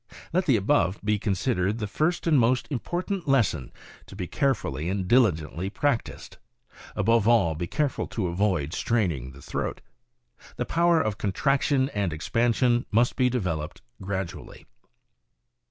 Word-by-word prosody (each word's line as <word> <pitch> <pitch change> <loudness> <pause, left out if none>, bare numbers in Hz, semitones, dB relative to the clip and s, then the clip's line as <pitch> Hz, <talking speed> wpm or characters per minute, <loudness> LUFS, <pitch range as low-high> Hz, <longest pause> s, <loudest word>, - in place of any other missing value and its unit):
Let 185 +1 +1
the 130 -6 +5
above 95 -2 +1
be 105 0 +1
considered 100 0 0
the 110 - -3
first 155 - -1
and 155 -5 +4
most 125 +2 +2
important 175 - -3
lesson 100 - +1 0.4
to - - -11
be 95 -2 -4
carefully 90 - -1
and 95 -1 -2
diligently 95 -6 +2
practiced. 130 +2 -2 0.6
Above 110 +1 +2
all, 110 -9 +4
be 85 +2 -4
careful 145 - -1
to 110 - -3
avoid 85 -4 0
straining 85 - -1
the 70 +2 -14
throat. - - -3 0.8
The 125 - -2
power 170 +2 +3
of 110 -9 -1
contraction 135 +6 +1
and 100 -8 -1
expansion 120 +8 +1
must 120 +3 +2
be 125 -1 +3
developed 85 - -3 0.2
gradually. 95 -2 -5
105 Hz, 140 wpm, -26 LUFS, 90-130 Hz, 0.8 s, the